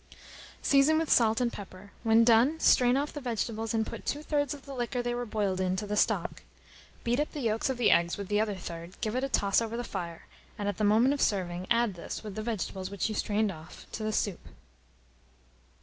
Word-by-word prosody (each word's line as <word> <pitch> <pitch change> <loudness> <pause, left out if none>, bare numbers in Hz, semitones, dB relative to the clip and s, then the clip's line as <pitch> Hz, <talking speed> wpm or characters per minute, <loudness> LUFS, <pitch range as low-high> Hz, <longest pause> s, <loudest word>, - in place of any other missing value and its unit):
Season 280 +3 +4
with 320 -1 0
salt 225 -1 +4
and 245 -1 0
pepper; 195 0 -10
when 225 0 +5
done, 240 +7 +4
strain 250 -3 +5
off 290 +2 -2
the 295 - -6
vegetables, 225 -2 -2
and 220 -1 +1
put - - -7
two 295 +1 -3
thirds 290 -2 0
of 290 -2 -7
the 280 - -8
liquor 245 -1 -2
they 240 0 -1
were 245 0 -3
boiled 200 -3 -1
in 185 0 +1
to 210 - -3
the 210 0 -2
stock. - - 0 0.6
Beat 240 +3 +1
up 300 - -1
the 295 - -4
yolks 225 +1 0
of 260 - -1
the 240 - +4
eggs 170 0 +3
with 200 -1 -5
the 210 +1 +2
other 210 -2 -1
third, 170 -1 -8
give 220 0 -2
it 255 - 0
a 275 - -1
toss 200 -4 +2
over 230 0 -3
the 240 - -2
fire, 170 -7 -6 0.3
and 205 -2 -3
at 205 - -2
the 215 - -1
moment 225 +6 +4
of 285 - -3
serving, 185 -2 0
add 235 -3 +2
this, 175 - -7
with 210 -2 -6
the 215 - -4
vegetables 195 -4 -3
which 200 +1 -2
you - - -2
strained 210 0 0
off, 160 -1 -12
to - - -5
the 215 0 -1
soup. 205 -3 -1
220 Hz, 230 wpm, -29 LUFS, 200-245 Hz, 0.6 s, when